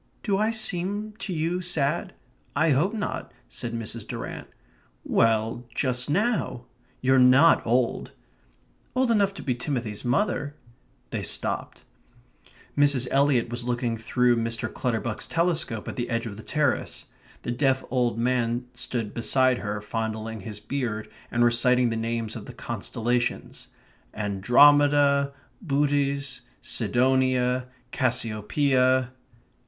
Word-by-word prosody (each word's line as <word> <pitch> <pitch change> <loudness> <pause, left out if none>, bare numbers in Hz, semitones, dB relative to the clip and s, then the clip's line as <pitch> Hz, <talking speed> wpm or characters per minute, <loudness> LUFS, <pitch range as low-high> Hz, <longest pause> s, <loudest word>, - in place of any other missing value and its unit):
"Do 200 -3 +1
I 215 +1 +2
seem 210 -1 -2
to 200 - -5
you 170 +2 -1
sad? 170 +1 -1 0.4
I 155 +2 +3
hope 165 +11 +2
not," 210 -1 -4 0.2
said 120 -1 -5
Mrs. 115 -1 -4
Durrant. - - -6 0.6
"Well, 115 +1 +1
just 125 0 0
now. 180 - 0 0.4
You're 130 0 +4
NOT 130 +6 +6
old." 120 +1 +1 0.8
"Old 255 -2 +2
enough 200 -3 +3
to - - -8
be 130 - 0
Timothy's 120 -4 -4
mother." 145 +2 0 0.6
They - - -2
stopped. - - -2 0.9
Miss 140 -3 +3
Eliot 135 -4 +3
was 120 0 -4
looking 120 -1 -1
through 120 +2 +2
Mr. 115 0 -2
Clutterbuck's 115 -3 -2
telescope 165 -10 -1
at - - -5
the 120 -1 -2
edge 115 -1 -1
of 105 -3 -6
the 110 - -9
terrace. 145 +2 -1 0.4
The - - -2
deaf 130 +1 +1
old 125 -2 +1
man 120 0 0
stood 120 -4 -3
beside 130 +1 +2
her, 105 -1 -4
fondling 110 0 -4
his 105 +1 -7
beard, 110 -2 -3 0.2
and 120 0 +2
reciting 120 +1 +3
the 115 - -2
names 115 -1 -2
of - - -8
the - - -8
constellations: 120 +1 -3 0.5
"Andromeda, 140 +7 +4 0.3
Bootes, 140 -4 0 0.2
Sidonia, 125 +1 +1 0.2
Cassiopeia...." 130 +2 +1
125 Hz, 125 wpm, -26 LUFS, 115-145 Hz, 0.9 s, NOT